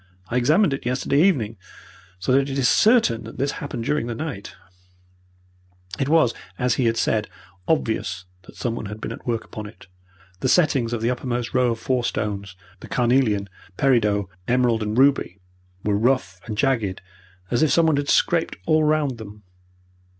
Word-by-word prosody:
I 120 - 0
examined 150 - +3
it 135 - -4
yesterday 130 +3 +1
evening, 125 - +2 0.6
so 95 +7 -2
that 135 +1 +3
it 135 - -3
is 130 -2 +3
certain 215 - +4
that 115 - -10
this 140 +1 0
has - - -8
happened 140 -5 -5
during 150 -1 -1
the 120 - -4
night." 135 -8 -6 1.4
It 135 - 0
was, 155 -7 +4 0.2
as 125 -1 +1
he 130 - 0
had 115 0 +1
said, 110 -2 0 0.4
obvious 110 - -1 0.2
that - - -14
someone 115 -3 -3
had 105 +2 -7
been - - -5
at - - -9
work 115 -2 -1
upon 110 -1 -8
it. 105 - -14 0.5
The 130 - 0
settings 135 -8 +3
of 115 -2 -3
the 120 - +2
uppermost 120 -1 -3
row 125 -1 +3
of - - -7
four 125 -2 0
stones 100 -4 -3 0.2
the - - -11
carnelian, 120 -5 +1 0.3
peridot, 105 -7 +2 0.2
emerald, 120 -2 +2
and 105 +1 -2
ruby 135 -8 +3 0.5
were 105 -1 +1
rough 110 -7 0
and 105 -2 -4
jagged 115 -8 0 0.5
as 120 - +1
if 155 - +4
someone 160 -3 +3
had 145 0 -2
scraped 170 -1 +2
all 155 -1 +3
round 150 -5 +1
them. 105 -1 -11
120 Hz, 175 wpm, -23 LUFS, 110-140 Hz, 1.4 s, certain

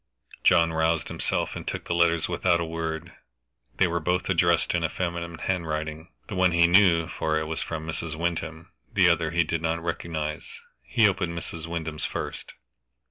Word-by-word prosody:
John 85 -1 +5
roused 80 +1 +1
himself, - - -1
and - - -7
took - - -3
the - - -1
letters 85 -1 +3
without 85 -2 +2
a 85 - -1
word. 80 +1 -4 0.6
They 95 - +5
were 85 -1 0
both 90 +3 0
addressed 85 -2 +3
in 85 - +1
feminine 85 -2 -3
handwriting. 80 -3 -3 0.2
The 110 - -6
one 90 -2 +3
he 85 0 +5
knew, 85 -2 +5
for 80 0 -1
it 80 - -1
was 80 +1 -3
from 80 -1 -4
Mrs. 80 -1 -4
Wyndham. 85 +1 -3 0.2
The 95 -3 +4
other 85 -1 +2
he 85 +1 +2
did 80 +1 -2
not 85 0 0
recognize. 80 -3 -3 0.3
He 110 - +3
opened 90 -3 -1
Mrs. 85 -1 -6
Wyndham's 80 -2 -3
first. - - -5
85 Hz, 175 wpm, -26 LUFS, 80-85 Hz, 0.6 s, John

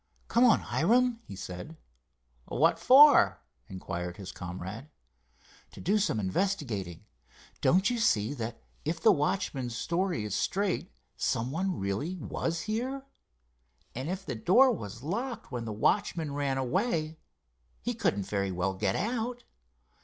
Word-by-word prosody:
"Come 235 - +4
on, 235 - +5
Hiram," 240 +6 +2
he - - -8
said. 95 - -8 0.7
"What 165 +6 +2
for?" 285 +2 +7 0.3
inquired 90 -1 -5
his 100 -2 -7
comrade. 95 - -7 0.8
"To - - -11
do 205 +4 +2
some 180 - +1
investigating. 105 - -2 0.6
Don't 190 +3 +4
you 240 - -1
see 110 - +2
that 115 -3 -6 0.2
if 160 +2 -2
the 220 - +6
watchman's 145 - -1
story 175 - -1
is 105 - -4
straight 195 -1 -1 0.3
some 120 +3 -1
one 185 +3 -1
really 100 - -2
was 165 -1 -3
here?" 255 +5 -3 0.9
"And 130 +6 -4
if 190 +1 -4
the 135 - -3
door 215 - +5
was 115 - -6
locked 230 - -4
when 120 -2 -4
the 110 - -4
watchman 160 - 0
ran 140 -2 -1
away 155 - -1 0.6
he 240 - -1
couldn't 185 - 0
very 100 -1 -1
well 90 +1 -1
get 95 0 -1
out." 240 +3 -2
160 Hz, 140 wpm, -29 LUFS, -, 0.9 s, for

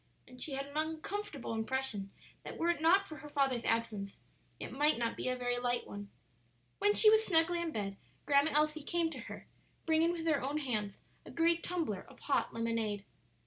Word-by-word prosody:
And 250 0 -12
she 295 - -2
had 275 +1 -2
an 285 +1 -7
uncomfortable 320 - -3
impression 220 -3 -2 0.3
that - - -8
were 340 +1 +2
it 335 - -4
not 370 +5 +5
for 310 - -8
her 295 - -10
father's 270 -5 +1
absence 220 -4 -1 0.4
it - - -6
might 295 +1 +3
not 230 -1 -1
be - - -2
a 255 - 0
very 245 -1 -1
light 245 -1 0
one. 205 0 -8 0.7
When 410 +1 +3
she 430 - +8
was 440 0 +5
snugly 340 -2 +3
in 335 -1 -2
bed, 200 -5 -3 0.3
Grandma 285 +1 +4
Elsie 305 +1 +2
came 335 +2 0
to - - -7
her, - - -8 0.4
bringing 325 +1 +3
with 335 -2 -4
her 310 -4 +2
own 280 +3 -1
hands 215 -9 -2 0.2
a - - -12
great 335 0 +2
tumbler 315 - -2
of - - -17
hot 285 - +1
lemonade. 230 -3 -2
285 Hz, 195 wpm, -33 LUFS, 230-325 Hz, 0.7 s, she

